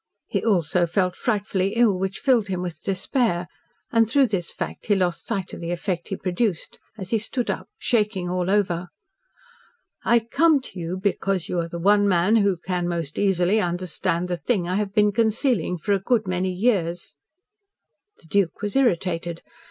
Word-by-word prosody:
He - - -2
also 175 -4 +2
felt 180 +1 0
frightfully 200 -3 -1
ill, 225 -6 +3
which 190 0 -2
filled 250 -7 +2
him 185 -2 -2
with 170 -3 -6
despair, 195 -1 0 0.5
and, 225 -1 +3
through 270 0 +4
this 180 -5 -2
fact, - - -6
he 205 - +4
lost 180 -3 -1
sight 195 -5 -3
of - - -7
the 170 - -4
effect 175 0 -3
he 195 - -3
produced, 185 0 -2 0.2
as 190 -3 -7
he 225 - +2
stood 240 +3 -2
up, - - -5
shaking 210 -6 0
all 180 0 -1
over. 180 -4 +1 1.2
"I 235 - +4
come 295 +7 +3
to 195 -7 -8
you 170 +2 -3
because 195 -2 -1
you 180 - -1
are 170 - -1
the 170 - -5
one 205 +3 +4
man 190 +4 +3
who 200 -4 +2
can 180 0 -2
most 165 -4 -3
easily 195 +1 +2
understand 175 -1 -1
the 175 -1 -2
thing 180 -1 -1
I 185 +2 0
have 205 -2 -1
been 210 -1 +4
concealing 220 - +1
for 200 +5 0
a 195 - +2
good 215 +1 +1
many 185 0 0
years." 180 -5 -1 1.0
The - - -21
Duke 195 +3 0
was 205 +3 -2
irritated. 175 -9 0
190 Hz, 180 wpm, -24 LUFS, 175-210 Hz, 1.2 s, through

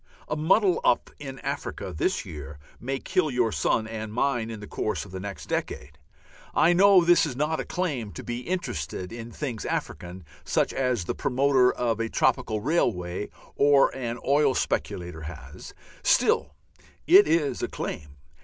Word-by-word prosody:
A - - -2
muddle 180 +5 +3
up - - +2
in 135 -2 -7
Africa 135 -9 -4
this - - 0
year 75 -1 -8 0.2
may 135 +3 -3
kill 185 +1 0
your 125 -4 +1
son 110 - +1
and 110 -1 -5
mine 120 -1 0
in 110 -2 -6
the 105 - -8
course 105 - -3
of 95 - -13
the 95 - -6
next 100 0 -7
decade. - - -4 0.6
I 170 - +5
know 190 0 +6
this 175 0 +5
is 130 - -5
not 150 +4 0
a - - -3
claim 145 - -2
to - - -8
be 120 0 -4
interested 125 - -4
in 115 0 -8
things 120 -5 -4
African, 90 0 -4 0.2
such - - 0
as 125 -7 0
the - - -2
promoter 130 -1 +3
of 115 -3 -1
a 115 0 -1
tropical 125 -5 +1
railway 95 - 0 0.3
or 140 -1 +4
an 120 -2 -3
oil 140 -1 +3
speculator 85 -2 -2
has; 80 0 -10 0.3
still - - +2 0.5
it 390 +4 +7
is 155 -4 +1
a - - 0
claim. 70 -1 -6
125 Hz, 165 wpm, -26 LUFS, 105-145 Hz, 0.6 s, it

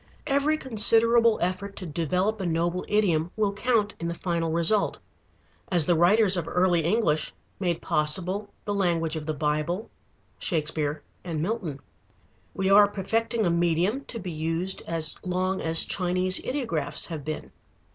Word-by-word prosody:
Every 290 +2 +1
considerable 230 -2 +3
effort 185 +3 -3
to 185 - -7
develop 180 +6 -1
a - - -3
noble 170 +2 -1
idiom 175 -6 +1
will 210 -2 0
count 210 -1 0
in 170 - -3
the 170 - -3
final 170 -2 -2
result, 170 +6 +3 0.7
as 175 -4 +3
the 175 - +3
writers 190 +4 +5
of 175 -3 -2
early 180 -2 +2
English 170 -4 0 0.3
made 175 -4 -2
possible 185 +7 0 0.2
the 205 - -2
language 170 -5 0
of 155 -1 -6
the 155 - -2
Bible, 155 +7 -2 0.5
Shakespeare, 150 -3 -2 0.2
and 165 -4 -4
Milton. 170 -6 -3 0.7
We 190 - -1
are 205 +1 +7
perfecting 225 +3 -1
a 175 - +2
medium 175 +9 0
to 235 - -8
be 185 -3 -6
used 165 +4 -1
as 160 -2 0
long 185 +1 -1
as 165 0 +5
Chinese 185 0 +2
ideographs 255 -3 -2
have 160 -4 -6
been. 155 +2 -6
180 Hz, 150 wpm, -26 LUFS, 165-205 Hz, 0.7 s, are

